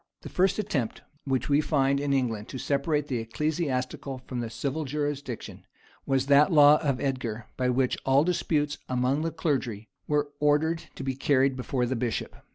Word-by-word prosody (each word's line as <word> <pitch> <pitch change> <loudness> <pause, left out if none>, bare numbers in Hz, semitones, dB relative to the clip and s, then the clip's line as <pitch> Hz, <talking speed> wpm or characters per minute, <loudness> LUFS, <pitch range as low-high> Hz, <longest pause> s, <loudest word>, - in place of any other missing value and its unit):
The - - -7
first 185 +1 +2
attempt 155 - -2 0.2
which 135 -2 0
we 145 +1 +3
find 140 -2 +2
in 145 0 -1
England 115 -6 0
to - - -6
separate 145 +2 0
the 130 -5 -2
ecclesiastical 130 0 -2
from 125 - -4
the 120 -1 -3
civil 135 +7 -3
jurisdiction, 145 -3 -4 0.4
was 135 -1 +2
that 145 +5 +5
law 150 -1 +7
of 140 -5 0
Edgar 120 -5 -3
by 125 -1 0
which 125 0 +1
all 135 +2 +4
disputes 150 -4 0
among 130 +3 +1
the 165 - 0
clergy 130 -10 -2 0.2
were 145 -1 +1
ordered 150 +3 +2
to - - -6
be 135 0 -1
carried 135 0 +2
before 125 0 -1
the 130 +2 -1
bishop. 115 -1 -2
135 Hz, 170 wpm, -27 LUFS, 125-150 Hz, 0.4 s, law